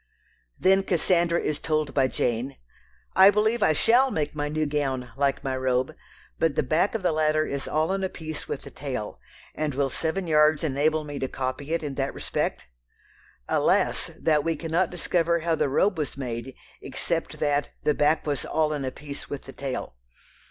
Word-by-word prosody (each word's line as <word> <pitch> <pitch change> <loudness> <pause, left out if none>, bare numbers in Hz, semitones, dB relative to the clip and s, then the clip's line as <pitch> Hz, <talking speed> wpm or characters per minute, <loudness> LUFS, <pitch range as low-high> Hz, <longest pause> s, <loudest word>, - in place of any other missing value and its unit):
Then 195 +1 +5
Cassandra 170 -1 +2
is 150 -1 -2
told 155 -2 -1
by 135 -2 +3
Jane, 125 +1 -1 0.6
"I 190 +1 +9
believe 215 +3 +2
I 155 - +4
shall 245 - +4
make 150 - -2
my 145 -1 -2
new 155 +1 0
gown 135 -4 -2
like 140 0 0
my 135 -2 -1
robe, 130 +3 0 0.4
but 160 -3 +2
the - - +2
back 160 - +1
of 220 - -2
the 180 - +3
latter 155 0 +2
is 140 -1 -4
all 155 +4 +1
in 195 0 -1
a 190 - 0
piece 155 -3 -7
with - - -4
the - - -9
tail, 130 -7 -5 0.3
and 150 -3 -2
will 135 -1 +1
seven 175 +4 -2
yards 150 -1 +4
enable 155 +2 +1
me 145 -1 -6
to 135 - -1
copy 130 +3 -4
it 165 -1 0
in 145 -2 -3
that 135 - -2
respect?" - - -2 0.8
Alas! - - +2
that 150 -2 +2
we 165 +1 0
cannot 165 +3 0
discover 170 -1 +1
how 165 0 +1
the 150 - +1
robe 185 +6 +2
was 145 -3 -3
made, 125 -1 -5 0.3
except - - -3
that 145 -1 +1
"the 150 - +3
back 150 +2 +2
was 145 -2 -1
all 155 -1 +1
in 145 -2 -3
a 130 - -2
piece 145 +1 -8
with 145 - -5
the 135 - -10
tail." 130 - -5
150 Hz, 190 wpm, -26 LUFS, 140-165 Hz, 0.8 s, I